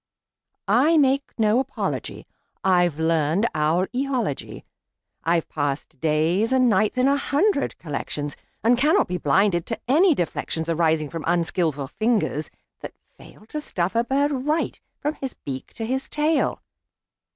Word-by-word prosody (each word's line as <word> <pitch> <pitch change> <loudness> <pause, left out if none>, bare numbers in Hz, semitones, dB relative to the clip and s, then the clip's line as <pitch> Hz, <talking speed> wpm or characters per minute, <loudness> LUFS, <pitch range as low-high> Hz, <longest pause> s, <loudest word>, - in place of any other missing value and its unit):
I 270 +11 +4
make 275 -1 +2
no 220 +1 +3
apology; 270 +1 -4 0.4
I've 175 -4 +2
learned 160 +4 +2
owl 160 +4 +2
eology. 255 - -2 0.6
I've 165 0 +1
passed 145 -1 -3
days 165 - +1
and 260 -1 +4
nights 215 +2 +2
in 255 +1 +3
a 280 - +4
hundred 285 +3 +1
collections, 145 -1 -4 0.3
And 240 +2 +4
cannot 300 +4 +3
be 180 0 -3
blinded 175 +4 +2
to 230 - -3
any 320 +6 +5
deflections 165 -3 -2
Arising 160 -2 +1
from 165 -2 -5
unskilful 170 -4 0
fingers 210 - -1 0.3
that - - -8 0.2
fail 215 - -16
To 300 - -4
stuff 180 -9 -2
a 230 0 +2
bird 280 +4 +1
right, 295 +4 -1 0.2
from 295 +1 -1
his 270 -4 -6
beak 130 -2 -7
to 225 - -5
his 260 +3 -2
tail. 305 +1 0
205 Hz, 140 wpm, -23 LUFS, 160-265 Hz, 0.6 s, any